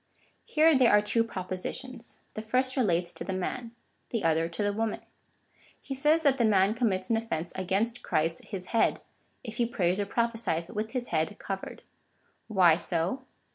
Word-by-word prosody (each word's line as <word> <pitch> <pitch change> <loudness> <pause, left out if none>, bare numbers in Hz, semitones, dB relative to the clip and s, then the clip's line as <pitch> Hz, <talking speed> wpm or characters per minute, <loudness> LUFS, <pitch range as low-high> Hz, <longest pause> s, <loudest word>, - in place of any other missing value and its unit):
Here 315 0 +4
there 255 -3 +5
are 210 - +7
two 230 +2 +2
propositions. 230 +5 -6 0.2
The 215 - -4
first 255 +4 +1
relates 180 -9 +1
to - - -6
the 190 - -3
man, 230 +6 -3 0.4
the 230 - -2
other 165 0 +2
to 170 +5 -3
the 205 0 +1
woman. 220 +1 -2 0.8
He 275 - -6
says 300 +4 +3
that 275 -3 +4
the 240 - +2
ma7i 205 -1 +4
commits 200 -5 0
an 225 - +4
offence 180 -7 -3
against 200 +6 -1
Christ 165 +2 -1
his 190 -3 -6
head, 230 - +2 0.4
if 225 -3 -7
he 235 - +2
prays 185 -4 0
or 200 - -1
prophesies 225 -7 -1
with 215 +2 -4
his 250 -2 -2
head 160 +6 -1
covered. 195 -1 -6 0.6
Why 180 -7 +5
so 175 +8 -1
215 Hz, 175 wpm, -29 LUFS, 185-235 Hz, 0.8 s, are